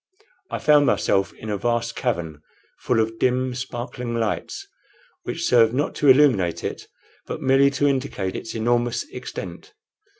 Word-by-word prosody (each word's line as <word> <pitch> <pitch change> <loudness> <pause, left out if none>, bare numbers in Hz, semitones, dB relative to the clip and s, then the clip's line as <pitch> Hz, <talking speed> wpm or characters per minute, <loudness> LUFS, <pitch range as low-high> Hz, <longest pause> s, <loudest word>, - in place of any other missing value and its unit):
I - - -3
found 150 -1 +4
myself 95 0 +1
in 110 - -7
a 100 - -2
vast 115 +1 -1
cavern, 85 - -3 0.4
full 120 -3 +1
of 110 0 -1
dim, 130 0 +1
sparkling 125 -1 -5
lights, 115 - -3 0.6
which 170 - -3
served 115 -1 +4
not 145 +3 0
to 145 - +3
illuminate 130 - +4
it, - - -5 0.4
but - - -4
merely 135 +1 +5
to 140 +1 -1
indicate 130 -9 -2
its 115 - -6
enormous 120 +1 0
extent. 420 +5 -8
120 Hz, 145 wpm, -23 LUFS, 110-135 Hz, 0.6 s, merely